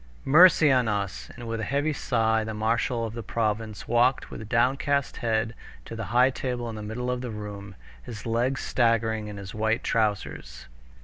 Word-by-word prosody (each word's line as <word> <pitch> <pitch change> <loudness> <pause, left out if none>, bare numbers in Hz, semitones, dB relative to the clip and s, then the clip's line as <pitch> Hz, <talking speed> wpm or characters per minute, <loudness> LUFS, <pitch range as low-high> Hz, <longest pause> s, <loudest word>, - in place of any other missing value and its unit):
"Mercy 155 0 +7
on 125 -3 +3
us!" 100 -3 -3
and 120 -2 -8
with 115 0 -3
a - - -3
heavy 145 +5 0
sigh 110 -5 +1
the 110 0 -5
marshal 115 +2 0
of 110 - -6
the 115 - -5
province 110 -1 -2
walked 120 +3 +2
with 110 0 -8
downcast 135 +3 +1
head 110 -1 0 0.3
to 115 - -7
the 115 -1 -4
high 125 +4 +4
table 125 -2 -3
in 115 - -5
the 110 - -6
middle 115 +4 -3
of 125 0 -3
the 125 - -5
room, 105 -2 -7 0.3
his 110 - -9
legs 120 +4 0
staggering 115 -3 +1
in 105 -1 -7
his 100 -1 -8
white 110 +1 0
trousers. 100 - -2
115 Hz, 185 wpm, -26 LUFS, 110-125 Hz, 0.3 s, Mercy